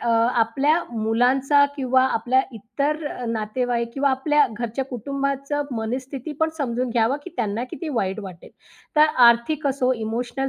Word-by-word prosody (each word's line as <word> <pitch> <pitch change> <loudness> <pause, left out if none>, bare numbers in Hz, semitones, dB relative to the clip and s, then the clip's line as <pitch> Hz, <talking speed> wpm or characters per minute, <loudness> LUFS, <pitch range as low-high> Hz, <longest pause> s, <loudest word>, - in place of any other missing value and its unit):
अ, 235 - -2
आपल्या 240 +7 +2
मुलांचा 250 +6 +3
किंवा 260 -1 +2
आपल्या 260 +1 +2
इतर 280 +8 -3
अ, 250 - -5
नातेवाईक 235 +1 -2
किंवा 275 0 +2
आपल्या 290 +2 +3
घरच्या 240 +3 -3
कुटुंबाच 275 +2 -3 0.2
मनस्थिती 255 +5 -4
पण 320 - +3
समजून 250 -2 -1
घ्यावी, 230 +4 +2
की 360 - -8
त्यांना 225 0 -1
किती 335 - -6
वाईट 190 -2 -1
वाटेल. 180 -3 -10 0.5
तर 305 +1 +7 0.2
आर्थिक 235 +6 +3
असो, 260 -2 +1
इमोशनल 240 +4 -3
255 Hz, 145 wpm, -23 LUFS, 230-275 Hz, 0.5 s, तर